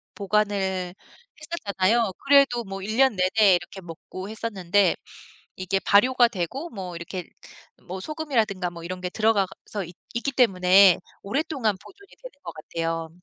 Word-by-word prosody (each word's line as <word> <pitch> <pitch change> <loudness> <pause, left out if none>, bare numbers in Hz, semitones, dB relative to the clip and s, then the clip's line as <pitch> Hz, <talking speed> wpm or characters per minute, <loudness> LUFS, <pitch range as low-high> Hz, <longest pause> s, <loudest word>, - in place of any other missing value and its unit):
보관을 195 -3 -1 0.5
했었잖아요. 225 - 0
그래도 275 -4 +5
뭐 195 0 -6
1 215 +3 -3
년 265 -3 +4
내내 190 +1 +4
이렇게 190 +2 -6
먹고 185 +3 -9
했었는데 205 -3 +1 0.6
이게 185 +1 -1
발효가 245 +5 +4
되고 235 - -4
뭐 185 -5 -7
이렇게 170 +2 -6 0.6
뭐 185 +2 -6
소금이라든가 225 - -1
뭐 170 -1 -10
이런 185 +1 -6
게 180 - -3
들어가서 205 -1 -1
있 175 +1 -13 0.2
있기 240 +4 -2
때문에 190 -6 +5 0.2
오랫동안 240 - -1
보존이 400 - -17
되는 - - -9
것 170 - -6
같아요. 165 +1 -4
200 Hz, 315 characters per minute, -25 LUFS, 185-235 Hz, 0.6 s, 그래도